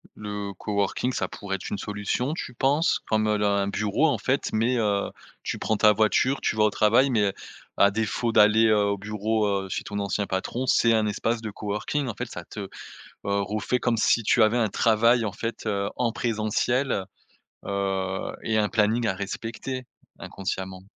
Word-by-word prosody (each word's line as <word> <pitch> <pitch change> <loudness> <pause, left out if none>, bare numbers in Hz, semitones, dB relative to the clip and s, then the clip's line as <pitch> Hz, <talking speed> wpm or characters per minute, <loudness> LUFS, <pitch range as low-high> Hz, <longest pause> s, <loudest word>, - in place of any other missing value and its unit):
Le 105 -1 -5
coworking, 100 +6 -1
ça - - -2
pourrait 95 -1 -4
être - - -8
une 100 - -3
solution, 105 +8 -2
tu 125 -6 -6
penses? 145 +7 +2
Comme 110 -1 +2
là 100 -1 +1
un 100 - -1
bureau, 105 +9 +1
en 130 -7 0
fait, 130 +5 0
mais 115 +4 +1
heu, 100 -3 0 0.3
tu - - -3
prends 110 - 0
ta 105 +1 +6
voiture, 110 +6 +2
tu - - -1
vas 105 - +4
au 105 - +4
travail, 115 +7 +3
mais 115 -4 +2
heu, 100 - 0 0.4
à 100 - +5
défaut 110 +2 -1
d'aller, 110 +1 +5
heu, 110 -1 +4
au 100 -1 0
bureau, 105 +1 -1 0.2
heu, 95 - -8
chez - - -3
ton 100 0 -5
ancien 100 0 -1
patron, 105 +8 -2
c'est 115 -2 +4
un 110 -1 +2
espace 115 +3 -1
de 110 - -4
coworking. 105 +8 -3
En 115 - -4
fait, 125 +4 -4
ça 85 - -7
te, 105 - -8
heu, 100 - -5 0.6
refait 100 +4 -1
comme 120 -2 +1
si 110 +1 +3
tu 120 - +3
avais 110 +3 +3
un 110 -3 +2
travail, 115 +3 +3
en 100 - -3
fait, 115 +2 -5
heu, 100 -1 -1
en 120 -2 0
présentiel. 115 0 0 0.6
Heu, 95 -1 -2
et 110 -1 0
un 105 -1 +2
planning 110 +2 +2
à 95 - 0
respecter, 115 +6 -5 0.3
inconsciemment. 95 -1 -5
105 Hz, 190 wpm, -25 LUFS, 100-115 Hz, 0.6 s, ta